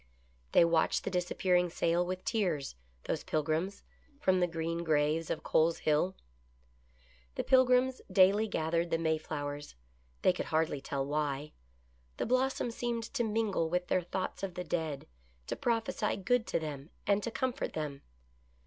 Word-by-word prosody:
They - - +7
watched 165 -1 +2
the 195 - -3
dis 180 -1 -1
appearing 180 -1 +2
sail 170 +1 +1
with 185 +1 -4
tears, 180 - 0 0.3
those - - -2
Pilgrims, 155 +6 -1 0.4
from 185 -10 +3
the 180 - +3
Screen 165 0 -2
or 160 -2 +1
raves 150 +2 +1
of - - 0
O - - -18
O - - -32
Cole's 160 +1 +3
Hill. 155 +5 +1 1.2
The - - -1
Pilgrims 255 0 +4
daily 200 +3 +5
gathered 165 -1 0
the 165 - +2
Mayflowers. 150 - -3 0.5
They 185 - +5
could - - -4
hard 160 0 +1
ly 145 - -3
tell 135 0 -3
why. 145 0 -2 0.6
The - - -1
blossom 255 0 +1
seemed 235 0 -2
to 260 -4 +1
mingle 210 -7 0
with 180 +1 -1
their 185 - +3
thoughts 185 +2 -4
of 190 -3 -4
the 180 - -3
dead, 160 -5 -2 0.4
to - - -3
prophesy 225 -2 0
good 235 +3 +1
to - - 0
them 150 -2 -6 0.2
and 200 0 +3
to 235 - -2
comfort 260 +3 -2
them. 150 -3 -4
175 Hz, 165 wpm, -32 LUFS, 155-210 Hz, 1.2 s, They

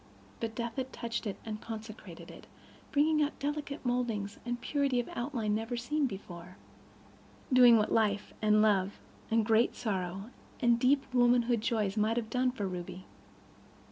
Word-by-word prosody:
But 225 -1 -4
death 235 0 -4
had 260 0 -3
touched 235 -1 -4
it 200 - -4
and 215 -1 -5
consecrated 220 -1 -9
it, - - -13 0.4
bringing 305 +1 +3
out 295 0 0
delicate 290 -1 -4
modelings 230 -5 -1
and 240 0 -2
purity 275 -1 0
of 240 - -2
outline 240 -4 -2
never 225 +3 -2
seen 285 +4 0
before—doing 195 - 0
what 215 - +1
life 210 -2 +1
and 215 0 +4
love 200 -2 +2 0.3
and 225 -1 +2
great 225 +1 +3
sorrow 195 0 -3 0.3
and 235 -2 +3
deep 270 +3 +3
womanhood 240 -2 +3
joys 220 -3 0
might 215 +2 +2
have 225 -2 -3
done 255 0 +2
for 210 -6 -3
Ruby. 180 0 -6
230 Hz, 150 wpm, -31 LUFS, 210-250 Hz, 0.4 s, and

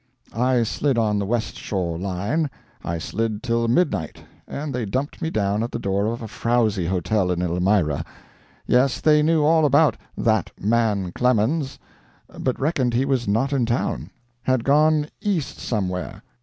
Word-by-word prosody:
I 125 +1 +2
slid 135 +3 0
on 105 -3 +2
the 100 - -2
West 115 +1 -1
Shore 90 -4 -2
line, 100 - -1 0.3
I 85 - -2
slid 110 +5 -3
till 115 -1 +1
midnight, 115 - 0 0.2
and 145 0 -5
they 125 -1 -2
dumped 130 +8 -3
me 160 - -1
down 105 -5 0
at 115 - -3
the - - -3
door 100 -1 0
of 115 +1 -3
a - - -5
frowzy 110 -5 0
hotel 90 +2 0
in 90 -1 0
Elmira. 90 -3 +1 0.6
Yes, 125 +1 +3
they 150 -1 +4
knew 155 0 +3
all 160 +1 +4
about 145 +1 +4 0.2
"that 110 -5 +1
man 105 -4 +1
Clemens," 125 - +1 0.6
but 130 - -1
reckoned 130 -5 0
he 130 +3 +2
was 130 -4 0
not 115 +8 +1
in 135 -3 +2
town; 120 +2 -1 0.3
had 130 -2 +1
gone 150 +2 +3
East 185 -9 -2
somewhere. 95 -2 -3
115 Hz, 160 wpm, -23 LUFS, 100-135 Hz, 0.6 s, they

